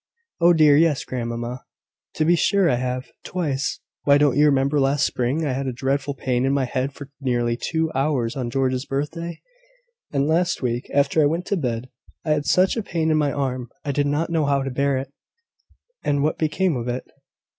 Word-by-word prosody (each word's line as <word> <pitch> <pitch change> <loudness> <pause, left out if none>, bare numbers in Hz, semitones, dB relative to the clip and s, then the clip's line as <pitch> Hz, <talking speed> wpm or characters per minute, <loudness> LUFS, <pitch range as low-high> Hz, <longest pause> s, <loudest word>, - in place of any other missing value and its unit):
"Oh, 170 0 +6
dear, 155 -3 +6
yes, 155 -3 +2
grandmamma: 120 0 -4 0.5
to 155 - +1
be 175 +2 +5
sure 195 +2 +3
I 125 - +2
have; 125 +1 -3
twice. 150 -7 -2 0.2
Why, 140 0 +5
don't 145 -3 +3
you 150 +1 +5
remember, 140 +1 +2
last 135 0 +2
spring, 130 +6 -1
I 140 - 0
had 135 +1 -2
a - - 0
dreadful 135 +3 -1
pain 125 -1 -1
in 135 +1 +2
my 140 -2 +1
head 130 +2 -2
for 140 0 -11
nearly 120 -3 0
two 160 +5 -1
hours, 135 -4 0
on 125 -3 -3
George's 130 +1 -1
birthday? 165 +5 -3 0.7
And 140 0 +1
last 175 +3 +1
week, 120 0 -2
after 145 +3 +3
I 145 - +5
went 170 +4 -2
to 200 - 0
bed, 125 -7 -2 0.4
I 155 - 0
had 150 -1 0
such 185 +1 +3
a 230 - -1
pain 165 -5 -1
in 155 - +3
my 145 -2 +2
arm, 130 -4 -2 0.2
I 145 - 0
did 145 +1 +1
not 150 +4 -1
know 160 -3 +1
how 140 -1 +1
to 135 - -3
bear 140 +1 +1
it." 135 +1 -5 0.9
"And 145 -1 +1
what 155 - 0
became 165 +2 +1
of 120 0 -4
it?" 125 +1 -3
140 Hz, 205 wpm, -23 LUFS, 130-155 Hz, 0.9 s, Oh